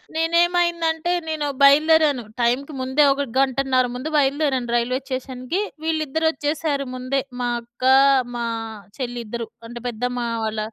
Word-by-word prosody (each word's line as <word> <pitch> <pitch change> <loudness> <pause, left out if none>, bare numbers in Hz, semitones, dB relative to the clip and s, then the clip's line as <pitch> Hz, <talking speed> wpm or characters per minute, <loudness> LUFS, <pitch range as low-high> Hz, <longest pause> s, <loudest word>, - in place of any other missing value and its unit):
నేనేమైందంటే, 340 0 +1 0.2
నేను 310 -2 -2 0.2
బయలుదేరాను. 295 -2 +5 0.2
టైమ్‌కి 260 +5 0
ముందే 265 +3 +2
ఒక 285 - -3 0.2
గంటన్నర 265 -1 +2
ముందు 275 +5 -4
బయలుదేరాను 275 -3 +1
రైల్వే 245 +2 0
స్టేషన్‌కి. 260 +5 -3 0.2
విళ్ళిద్దరు 320 0 0
వచ్చేసారు 290 -1 -2
ముందే. 255 +2 -1 0.2
మా 245 - 0
అక్క, 240 +2 -15 0.5
మా 235 -1 -2 0.5
చెల్లి 245 -2 -4
ఇద్దరు. 230 0 -5 0.2
అంటే, 240 0 -8
పెద్దమ్మ 245 +2 -3 0.3
వాళ్ళ 215 0 -3
275 Hz, 125 wpm, -22 LUFS, 250-315 Hz, 0.5 s, బయలుదేరాను